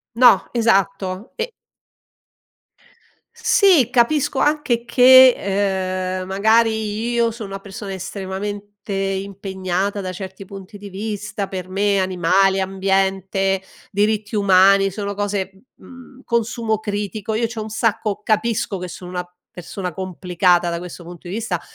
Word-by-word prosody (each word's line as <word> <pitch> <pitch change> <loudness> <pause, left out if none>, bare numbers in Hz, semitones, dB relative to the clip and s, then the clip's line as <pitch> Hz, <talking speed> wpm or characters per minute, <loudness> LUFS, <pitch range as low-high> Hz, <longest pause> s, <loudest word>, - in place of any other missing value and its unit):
No, 245 0 +5
esatto 195 -3 0
e 475 +1 -3 1.8
Sì, 405 - +4
capisco 265 +3 +2
anche 295 -6 +1
che, 255 +1 +8 0.9
ehm, 185 - -6
magari 220 +2 +1
io 235 -1 +2
sono 220 -3 -8
una 195 0 -6
persona 200 +1 -8
estremamente 195 +2 -5 0.3
impegnata 195 0 -2
da 185 -1 -4
certi 190 +1 -8
punti 195 +1 -11
di 200 0 -9
vista, 205 0 -4
per 185 -2 -6
me 200 +1 +1
animali, 190 +1 +2
ambiente, 195 0 0 0.3
diritti 210 +1 0
umani, 195 -1 +5
sono 200 +1 -4
cose, 200 -2 -2 0.2
mhmm, 260 0 -15
consumo 230 -1 -1
critico, 210 0 -3
io 230 +2 +1
c'ho 225 -1 -6
un 215 - -6
sacco 215 -1 -1
capisco 215 -2 0
che 180 0 -6
sono 180 +1 -9
una 180 -1 -5 0.2
persona 180 +1 -6
complicata 180 0 +1
da 170 - -2
questo 175 0 -9
punto 175 0 -12
di 180 - -5
vista 215 -6 -2
200 Hz, 125 wpm, -20 LUFS, 190-225 Hz, 1.8 s, che